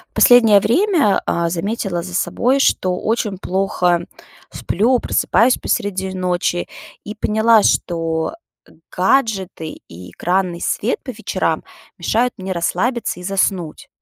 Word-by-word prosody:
Последнее 225 -4 +6
время, 320 - +2
а, 170 0 0
заметила 185 0 -2
за 180 0 -8
собой, 250 +8 +1
что 185 -9 +1
очень 215 -3 -2
плохо 180 -2 0 0.5
сплю, 235 +7 +1
просыпаюсь 230 +2 +2
посреди 190 -2 -2
ночи 180 -1 -1 0.4
и 210 - -7
поняла, 220 +1 +3
что 165 - 0 0.6
гаджеты 190 - -1
и 90 +2 -11
экранный 180 -1 -1
свет 230 - -1
по 260 - -5
вечерам 185 -8 -2 0.3
мешают 230 +8 0
мне 190 0 -4
расслабиться 185 +5 -1
и - - -9
заснуть. 185 -3 -2
190 Hz, 115 wpm, -18 LUFS, 175-225 Hz, 0.6 s, Последнее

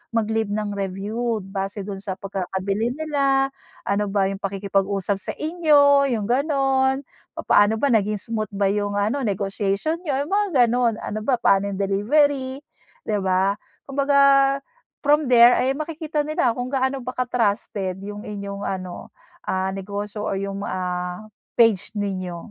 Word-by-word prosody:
mag-leave 220 -1 0
ng 210 -1 -2
review 205 +3 -2
base 195 +1 -4
dun 195 -1 -6
sa 195 -2 -4
pagkakabili 195 +4 -2
nila, 275 -3 +1 0.3
ano 205 +1 0
ba 200 -1 +1
yung 195 - -6
pakikipag-usap 195 0 -1
sa - - -4
inyo, 295 -4 +4
yung 210 - -2
ganun. 270 0 +2 0.3
Papaano 205 +2 +3
ba 280 -3 +2
naging 210 -2 +2
smooth 220 -2 -3
ba 195 -1 +2
yung 205 0 -1
ano 220 +8 0
negotiation 200 - -1
niyo, 280 -3 0
yung 310 - -9
mga 395 -11 +3
ganun, 235 -1 +1
ano 215 - -4
ba 265 - +3
paano 200 -2 +3
yung - - -4
delivery. 260 +7 +1 0.4
Di 210 - 0
ba? 190 +1 +2 0.3
Kumbaga 275 0 +4 0.5
from 295 -2 +3
there 240 0 +8
ay 265 +1 +1
makikita 310 -1 -3
nila 295 -6 +1
kung 245 +1 -3
gaano 265 0 0
ba 255 - -4
ka-trusted 205 -6 -1
yung 205 +1 -7
inyong 200 -1 -6
ano, 185 -2 -5 0.3
ah, 190 0 -1
negosyo 205 +2 -5
o - - -1
yung 200 0 -4
ah, 180 +1 -3 0.3
page 225 -3 +3
ninyo. 185 -4 -3
215 Hz, 145 wpm, -23 LUFS, 195-270 Hz, 0.5 s, there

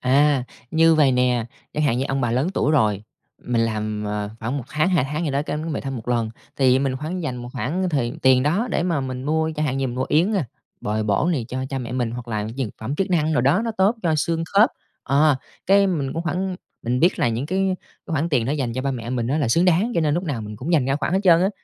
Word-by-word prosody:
À, 140 +1 +3 0.3
như 165 0 +5
vầy 145 -4 +4
nè, 125 -2 +2 0.3
chẳng 150 - -1
hạn 130 -5 +2
như 130 - 0
ông 135 0 0
bà 120 -3 0
lớn 130 +7 +1
tuổi 150 - +2
rồi, 105 -8 +2 0.4
mình 120 -1 0
làm, 110 -2 -2
à, 105 0 -3
khoảng 115 +5 -2
1 130 - -6
tháng, 155 +4 +1
2 175 -8 +2
tháng 150 +5 -3
gì 150 - -1
đó 140 +1 0
cái 150 - -3
về 155 0 -3
thăm 135 -1 -4
1 115 0 -8
lần. 115 -2 0 0.3
Thì 130 -1 +4
mình 135 -1 0
khoảng 165 +6 -4
dành 130 -6 -3
một 120 0 -7
khoảng 155 - -1
thời 135 -8 0
tiền 130 -1 +5
đó 180 - +1
để - - +1
mà 170 -5 0
mình 130 -1 -5
mua, 160 +2 +1
chẳng 150 - 0
hạn 135 -2 -1
như 135 - 0
mình 120 - -4
mua 130 - 0
yến, 170 +8 +3
ơ, 195 -4 +1 0.4
bồi 110 +1 -1
bổ 105 - +1
này 135 -8 -1
cho 130 +1 -3
cha 135 - -2
mẹ 120 -1 -5
mình, 125 -2 -1
hoặc 120 0 -7
là 105 -2 -2
dược 125 +1 -3
phẩm 115 +6 -3
chức 195 +5 -1
năng 160 -3 +2
đồ 150 - +2
đó, 140 - +3
nó 230 - -1
tốt 195 +4 +4
cho 165 -3 +2
xương 165 +2 0
khớp. 210 +4 +6 0.3
Ờ, 145 +1 +3 0.3
cái 200 +1 +5
mình 150 -8 -1
cũng 165 - -3
khoảng 180 +1 -2 0.3
mình 125 +2 0
biết 175 +3 +3
là - - +2
những 115 +4 -2
cái 185 +4 -1 0.5
cái 165 - -5
khoản 160 +2 0
tiền 130 -8 +1
đó 135 - 0
dành 135 -6 -1
cho 130 +2 -3
ba 140 - 0
mẹ 120 -3 -5
mình 120 -2 -1
á 140 +5 0
là 145 - +1
xứng 165 +10 +3
đáng 185 +7 +3
cho - - +2
nên 150 -2 +2
lúc 175 +3 -1
nào 140 -9 -2
mình 105 0 -7
cũng 145 +10 -3
dành 150 -6 +4
ra 135 +2 +1
khoản 150 - -2
hết 190 - +2
trơn 170 -4 +6
á. 190 - +3
140 Hz, 285 wpm, -22 LUFS, 125-165 Hz, 0.5 s, khớp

